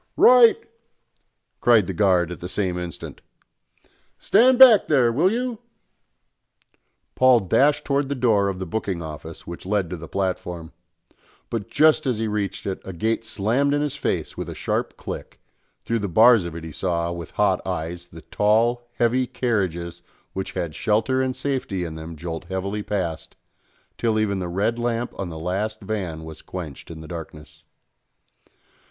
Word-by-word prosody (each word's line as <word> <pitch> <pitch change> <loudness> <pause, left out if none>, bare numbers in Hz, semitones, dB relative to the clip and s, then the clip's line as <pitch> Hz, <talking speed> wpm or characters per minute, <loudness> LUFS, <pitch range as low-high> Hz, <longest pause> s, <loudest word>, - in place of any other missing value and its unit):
"Right!" 245 -2 +7 1.0
cried 115 -5 +5
the 95 - -4
guard 90 -2 +2
at 90 - -7
the 90 - -6
same 95 -2 -1
instant. 90 -2 -7 1.0
"Stand 245 +5 +4
back 245 -6 +8
there, 130 -6 +4
will 165 +11 +2
you!" 240 -1 -2 1.5
Paul 130 -2 +5
dashed 140 - +2
towards 140 0 +1
the 140 - -2
door 110 -6 +2
of 95 - -4
the 95 - -4
booking 95 -2 -3
office 80 +1 -9
which 85 - -8
led 95 -3 -1
to 90 - -4
the 80 0 -9
platform; 90 -3 -3 0.8
but 115 -4 -3
just 155 -2 +4
as 125 -4 +1
he 110 0 -1
reached 105 -2 -3
it 95 -1 -3
a 95 - -7
gate 110 +6 -1
slammed 115 +7 +1
in 145 - 0
his 150 - -2
face - - -2
with - - -5
a - - -7
sharp - - -2
click, - - -7 0.5
through 115 0 0
the 100 - -2
bars 110 +2 +6
of 85 -2 -6
it 85 - -7
he 80 - -7
saw, 85 0 -1
with 85 -2 -6
hot - - +1
eyes, 85 +2 -4
the 80 -2 -13
tall, 115 +6 +1
heavy 125 +2 +1
carriages 85 -9 -2 0.3
which 95 0 -4
had 85 -3 -3
shelter 110 +8 +1
and 130 -1 -1
safety 130 -9 -2
in 80 -2 -5
them 80 +1 -8
jolt 80 +2 -6
heavily 95 +3 -3
past, 90 -6 -4 0.6
till 115 -2 +1
even 100 -3 0
the 90 - -3
red 105 +7 0
lamp 120 0 -2
on 95 -3 -3
the 80 - -7
last 100 +6 -2
van 90 -7 -4
was 80 -1 -10
quenched 80 -7 -8
in 80 -1 -8
the 80 - -10
darkness. 80 -3 -9
100 Hz, 170 wpm, -23 LUFS, 85-120 Hz, 1.5 s, back